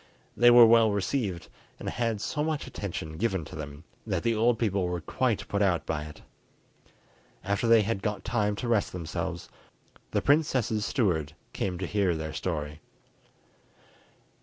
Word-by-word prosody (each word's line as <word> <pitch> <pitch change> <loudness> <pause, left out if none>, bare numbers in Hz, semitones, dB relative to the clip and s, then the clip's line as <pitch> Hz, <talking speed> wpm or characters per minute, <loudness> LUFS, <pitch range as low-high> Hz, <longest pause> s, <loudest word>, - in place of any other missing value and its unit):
They 120 0 +6
were 120 -1 +9
well 115 -1 +6
received, 100 - -2 0.3
and - - -7
had 115 -4 -1
so 150 - -2
much 155 -2 -2
attention 80 -5 -6
given 95 -6 -1
to - - -10
them, 75 -1 -8 0.2
that - - -1
the 115 -1 +2
old 115 +2 +2
people 100 -5 0
were 90 0 -2
quite 120 - -1
put 100 - -1
out 90 -4 +2
by 75 -2 -3
it. 75 - -12 1.2
After 100 +4 0
they 115 -1 +6
had 105 -1 -2
got 105 -1 -3
time 105 -3 0
to 120 - -4
rest 115 -4 +1
themselves, 85 -3 -4 0.6
the - - -1
princess's 130 -8 +2
steward 85 - 0 0.2
came 90 -2 -2
to 95 - -3
hear 95 -2 +1
their 80 -1 -5
story. 75 -4 -4
100 Hz, 160 wpm, -28 LUFS, 85-115 Hz, 1.2 s, were